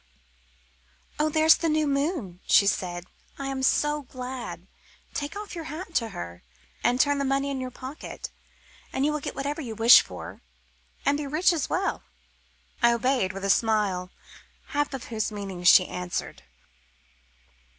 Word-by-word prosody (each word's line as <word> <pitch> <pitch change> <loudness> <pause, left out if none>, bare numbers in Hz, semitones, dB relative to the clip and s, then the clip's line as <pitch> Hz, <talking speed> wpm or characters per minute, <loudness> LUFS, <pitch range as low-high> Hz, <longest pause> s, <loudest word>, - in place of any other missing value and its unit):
"Oh, 305 +1 +3
there's 315 +1 +5
the 330 - 0
new 310 0 +2
moon," 280 - -1
she 200 - +6
said. 175 -3 -1 0.3
"I 275 - -5
am 270 -1 -3
so 295 +3 +2
glad. 255 -1 -7 0.5
Take 290 +4 -4 0.2
your 335 -3 -6
hat 325 +5 -6
off - - -21
to 230 -2 -1
her 85 - -7 0.4
and 245 +2 +2
turn 285 0 +3
the - - 0
money 275 +1 0
in 265 -1 -3
your 255 - -4
pocket, 260 +4 -8 0.6
and 270 - 0
you 300 - +2
will 300 - -1
get - - -5
whatever 285 +3 -3
you 230 -6 -6
wish 230 +2 +9
for, - - -9 0.6
and 285 +1 +2
be 290 - -3
rich 315 +6 +3
as 315 -5 -2
well." 385 +2 -1 0.8
I 235 -1 +5
obeyed 235 -5 +1
with 195 0 -6
a - - 0
smile, 205 -5 +1 0.6
half 290 0 0
of 260 - -7
whose 220 0 -1
meaning 195 -4 -6
she 180 +1 +8
answered. 180 -1 -4
265 Hz, 160 wpm, -26 LUFS, 215-295 Hz, 0.8 s, wish